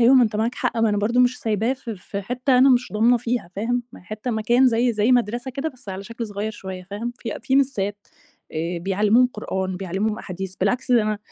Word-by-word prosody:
أيوه 245 +3 +6
ما 255 - +7
أنت 215 -1 -2
معاك 225 +3 0
حق، 245 -2 -2
ما 225 -1 +3
أنا 205 - +1
برضه 235 +4 +2
مش 250 0 +2
سايباه 220 +3 0
في 235 -5 -7
في 200 +2 -6
حتة 250 +4 +1
أنا 265 +1 +7
مش 245 -2 +2
ضامنة 230 +3 +4
فيها، 240 -5 -2
فاهم، 245 +4 0
ما - - -12
هي - - -22
حتة 215 +5 -5
مكان 235 +4 +3
زي 235 +1 +2
زي 215 +4 +2
مدرسة 240 +1 +1
كده 275 +5 -3
بس 255 -7 -15
على 190 +1 -5
شكل 230 +1 -5
صغيّر 205 +1 -3
شوية، 190 -3 -7
فاهم، 230 +4 -4
في 235 - -5
أ - - -8
في 265 +3 +1
مِسّات 205 -7 0 0.4
آآ، 165 +2 -2
بيعلموهم 205 +7 +3
قرآن، 190 -5 -4
بيعلموهم 195 +4 -2
أحاديث، 190 -1 -6
بالعكس 250 +6 0
ده 235 -3 +5
أنا 215 -1 -1
225 Hz, 235 wpm, -23 LUFS, 205-245 Hz, 0.4 s, ما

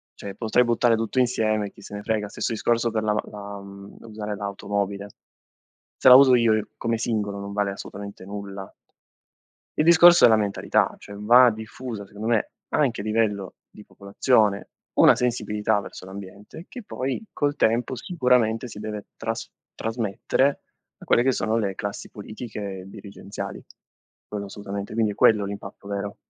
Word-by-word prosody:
Cioè, 100 -1 -8
potrei 115 +2 +2
buttare 120 0 +3
tutto 115 +3 -1
insieme 110 -4 +1
e - - -12
chi - - -17
se 105 - -9
ne 105 - -6
frega. 110 -1 -1
Stesso 115 - -3
discorso 115 +1 +1
per 110 -1 -1
la 105 0 +1 0.2
la 100 -1 -8
mhmm, 100 0 -12
usare 105 -2 -6
l'automobile. 100 0 -3 0.9
Se 130 - +6
la 125 - +11
uso 130 -1 +8
io, 110 -3 +2
come 115 -1 -1
singolo, 105 -3 -2
non 100 0 -6
vale 100 -1 0
assolutamente 100 0 -9
nulla. 100 -1 -8 1.0
Il 155 - +3
discorso 170 -1 +8
è - - +7
la 110 - +5
mentalità, 105 -2 0
cioè 100 - -11
va 120 +5 +6
diffusa, 110 0 -7
secondo 105 +2 -8
me, 115 -3 +1 0.2
anche 130 -7 +1
a - - -5
livello 105 -3 -1 0.2
di 105 - -14
popolazione, 100 0 +1 0.3
una - - +7
sensibilità 110 -3 0
verso 100 - -10
l'ambiente, 100 - -10
che 250 - -9
poi, 135 - -4
col 145 0 -1
tempo, 120 +3 +1
sicuramente, 125 -5 +1
si 105 - -10
deve 105 -1 -6
tras - - -4 0.2
trasmettere 115 +5 -1 0.4
a - - -13
quelle 120 - +4
che 130 - +3
sono 110 -2 0
le 100 -4 -1
classi 100 +1 -6
politiche 105 -3 -7
dirigenziali. 100 0 -8 0.6
Quello 105 -1 -5
assolutamente, 100 0 -6
quindi 110 -2 +1
è - - -10
quello 105 -2 +4
l'impatto 100 0 -8
vero. 100 0 -4
105 Hz, 160 wpm, -24 LUFS, 100-115 Hz, 1.0 s, la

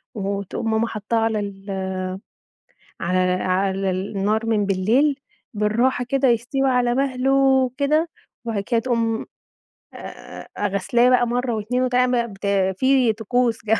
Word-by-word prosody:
وتقوم 200 +2 -3
ماما 220 +1 +1
حطّاه 220 +1 -3
على 225 -1 0
ال 195 -1 -5 1.1
على 180 +2 0 0.2
لا - - -4
على 190 +1 0
النار 200 +4 -1
من 215 -2 +1
بالليل 235 +10 +2 0.3
بالراحة 235 +4 +1
كده 275 -1 +2
يستوي 250 +4 +1
على 245 -1 +2
مَهله 265 -1 +2
كده، 305 +4 +1 0.4
وبعد 215 -4 -2
كده 235 +2 +1
تقوم 230 -2 -1 0.7
آآ، - - -11
آآ، - - -10
أ 205 - 0
غسلاه 220 +6 +2
بقى 245 -1 +3
مرّة 245 0 -1
واتنين 245 +4 -1
وتع 250 0 +2
بقى 235 -3 -1 0.4
في 260 -3 +3
طقوس 230 +1 -1
جمج 220 0 +2
230 Hz, 140 wpm, -22 LUFS, 205-255 Hz, 1.1 s, بقى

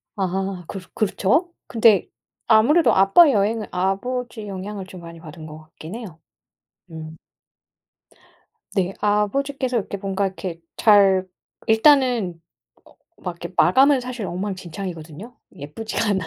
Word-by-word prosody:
아하 190 -2 -3
그 195 - -6
그렇죠? 220 - +1 0.2
근데 225 -5 +3 0.4
아무래도 240 +10 +5
아빠 235 - +6
여행을 215 0 0
아버지의 220 +5 -3
영향을 195 +1 -6
좀 185 -1 -12
많이 170 0 -11
받은 160 -1 -11
것 155 0 -10
같긴 160 +3 -11
해요. 200 -9 -9 0.7
음. 160 -1 -9 1.6
네, 190 -1 0
아버지께서 250 +6 0
이렇게 200 -1 -4
뭔가 195 0 -2
이렇게 185 -3 -7 0.2
잘 195 -3 +5 0.4
일단은 225 - +3 0.5
어 - - -21 0.3
막 180 -2 -3
이렇게 170 +1 -9
마감은 265 - +5
사실 250 -3 -5
엉망진창이거든요. 185 +1 -6 0.2
예쁘지가 215 +9 -4
않아. 190 -3 0
195 Hz, 285 characters per minute, -22 LUFS, 180-225 Hz, 1.6 s, 아빠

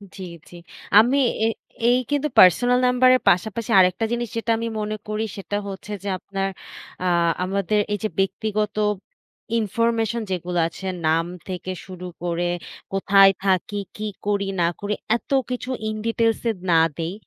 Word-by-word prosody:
জ্বী, 190 - -7 0.2
জ্বী। 175 - -12 0.4
আমি 250 +6 +4 0.3
এ - - +4 0.4
এই 245 +1 +4
কিন্তু 290 +1 +1
পার্সোনাল 245 +8 +6
নাম্বারের 255 0 +4
পাশাপাশি 220 +5 0
আরেকটা 185 +4 +3
জিনিস 240 0 -1
যেটা 230 0 -1
আমি 230 +1 -3
মনে 215 0 -3
করি, 215 +1 -2
সেটা 205 +1 -3
হচ্ছে 200 +1 -7
যে, - - -5
আপনার 195 0 -3 0.6
আ - - +2 0.4
আমাদের 200 +2 0
এই - - 0
যে 215 - 0
ব্যক্তিগত 210 +2 -1 0.8
ইনফরমেশন 230 +1 0
যেগুলো 180 -1 -2
আছে, 180 +3 -10 0.2
নাম 165 +1 +2 0.2
থেকে 185 0 -5
শুরু 185 -1 -8 0.2
করে, 175 0 -1 0.4
কোথায় 195 0 +6
থাকি, 195 +2 +1 0.2
কি 215 0 -4 0.2
করি, 200 -1 0
না 170 - +4
করি, 205 +1 -2 0.2
এত - - -23 0.2
কিছু 250 +1 -4 0.2
In 215 - -2
Details 230 0 +1
এ - - +3 0.2
না 165 - +6 0.2
দেই। 165 +2 -3
205 Hz, 155 wpm, -23 LUFS, 185-230 Hz, 0.8 s, পার্সোনাল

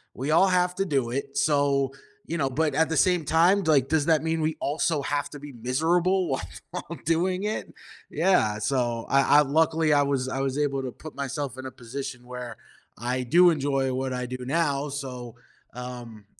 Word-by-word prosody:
we 135 +4 -2
all 185 +4 +5
have 180 -1 +2
to 195 - 0
do 135 -9 0
it, 140 +2 -4
so, 140 -2 +2 0.4
you 170 - -2
know, 135 - +1
but 150 +4 0
at 160 0 +2
the 160 - -1
same 180 -1 +3
time, 170 +6 +4
like, 140 -4 +3
does 160 0 +1
that 160 -1 +3
mean 160 0 -1
we 155 0 -1
also 150 +1 0
have 145 -1 -1
to 145 - -9
be 145 -1 -10
miserable 170 +10 +1
while 90 - -6
doing 180 +4 +1
it? 215 +1 -3 0.4
Yeah, 110 - +2
so, 120 -1 -1
I 135 - +4 0.2
I - - +7
luckily, 155 +2 +2
I 145 - +5
was 140 -2 0
I 135 - -3
was 135 +1 -1
able 140 -2 0
to 130 - -4
put 155 +5 -11
myself 140 -1 -4
in 130 - -7
a - - -8
position 125 +1 -7
where 125 -2 -7 0.4
I 125 +3 -2
do 175 +8 +6
enjoy 135 -3 0
what 130 0 -2
I 125 0 -3
do 125 +1 -5
now, 145 -1 0
so, 125 -4 -6 0.4
um, 120 -4 -8
140 Hz, 195 wpm, -26 LUFS, 130-160 Hz, 0.4 s, I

